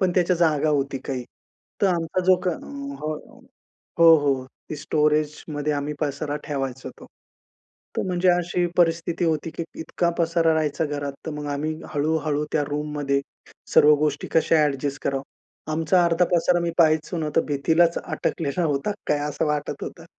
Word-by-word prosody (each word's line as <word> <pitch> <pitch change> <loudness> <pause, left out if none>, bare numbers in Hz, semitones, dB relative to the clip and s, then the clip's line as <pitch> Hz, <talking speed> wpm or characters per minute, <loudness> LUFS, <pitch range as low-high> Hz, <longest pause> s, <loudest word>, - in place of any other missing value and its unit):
पण 185 -2 +2
त्याच्या 180 0 +3
जागा 155 -3 +2
होती 140 -2 0
काही. 130 -3 -3 0.6
तर - - +6
आमचा 175 -1 0
जो 185 0 +6
क - - +2
अ - - +1 0.5
हो. 155 0 -2 0.9
हो, 165 -1 +9
हो. 135 -3 0 0.2
ती - - -3
स्टोरेजमध्ये 150 0 0
आम्ही 145 +1 -2
पसारा 145 0 -2
ठेवायचो 135 -2 -4
तो. - - -12 0.9
तर - - +2
म्हणजे 180 0 +2
अशी 175 0 +1
परिस्थिती 170 0 +2
होती 160 0 0
की 170 - -1 0.2
इतका 170 +1 -1
पसारा 165 -1 +2
राहायचा 155 0 0
घरात, 145 -1 -3
तर 160 - -3
मग 150 0 -5
आम्ही 155 +2 -2 0.2
हळू, 150 +2 +1
हळू 150 0 0
त्या 150 -2 +1
रूममध्ये 145 -2 -1 0.5
सर्व 150 +1 +7
गोष्टी 150 -1 -1
कशा 160 -1 +3
अ‍ॅडजस्ट 140 0 -2
करावं. 135 0 -1 0.5
आमचा 165 +3 +3
अर्धा 170 +1 +3
पसारा 175 +1 +3
मी 170 0 -1
पाहायचो 160 +1 +3
न, 155 -2 -1
तर - - +5
भिंतीलाच 160 +4 +2
अटकलेला 165 +2 -2
होता 145 +7 0 0.2
काय 150 -1 +2
असं 145 - -1
वाटत 145 -1 -2
होतं. 165 - -8
155 Hz, 165 wpm, -24 LUFS, 145-170 Hz, 0.9 s, हो